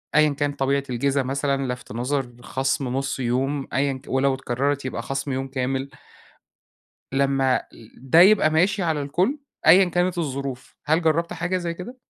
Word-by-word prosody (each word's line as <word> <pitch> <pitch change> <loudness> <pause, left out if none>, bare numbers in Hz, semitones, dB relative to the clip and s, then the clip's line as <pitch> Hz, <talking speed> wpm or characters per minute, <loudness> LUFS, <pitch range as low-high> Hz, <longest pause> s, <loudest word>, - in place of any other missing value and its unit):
أيًا 150 0 +6
كان 145 0 -1
طبيعة 140 0 0
الجِزا 135 +2 0
مثلًا، 135 -1 -1
لَفْت 125 - -11
نَظَر، 130 +3 -1
خَصم 135 +1 -1
نُص 135 0 -2
يوم 135 +3 -1
أيًا 135 +1 +1
ك 130 +2 -10
ولو 135 +1 +2
اتكرَّرِت 135 +2 -2
يبقى 130 - -3
خَصم 135 +1 -3
يوم 135 +1 -2
كامِل. 135 +1 -2 1.2
لمّا 135 -1 +2 0.3
ده 135 +6 +3
يبقى 190 -3 +6
ماشي 190 +6 +2
على 160 -4 0
الكُل، 180 - 0 0.3
أيًا 180 +5 +8
كانت 175 0 0
الظروف، 135 -4 -4
هل 160 +3 +2
جرَّبت 165 +1 +1
حاجة 175 +2 -2
زي 170 -2 -3
كده؟ 195 +9 -9
140 Hz, 160 wpm, -23 LUFS, 135-160 Hz, 1.2 s, أيًا